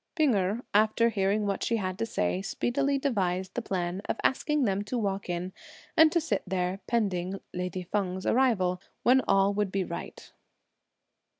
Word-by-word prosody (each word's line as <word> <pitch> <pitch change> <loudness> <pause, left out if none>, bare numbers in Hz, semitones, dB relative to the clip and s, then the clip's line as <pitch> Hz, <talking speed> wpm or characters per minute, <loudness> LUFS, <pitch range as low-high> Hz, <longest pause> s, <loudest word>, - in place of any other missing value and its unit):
P'ing 305 -7 +3
Erh, 200 +4 0
after 220 +2 +4
hearing 205 0 +1
what 200 -1 -1
she 230 - +1
had 185 -3 -3
to 230 - -1
say, 90 - -1
speedily 275 - 0
devised 190 -9 -1
the 245 - -2
plan 180 -3 -2
of - - 0
asking 300 +2 +1
them 200 -3 0
to 245 +4 -2
walk 200 -4 -2
in, 175 +1 -3 0.4
and 320 -2 +7
to 340 - +3
sit 325 - -1
there 185 +1 -1
pending 195 -5 -1
(lady 180 0 -3
Feng's 185 0 -2
arrival), 195 -8 +2 0.2
when 260 +2 +5
all 195 +1 +4
would 205 -2 -1
be 195 0 0
right. - - -7
200 Hz, 170 wpm, -28 LUFS, 185-235 Hz, 0.4 s, and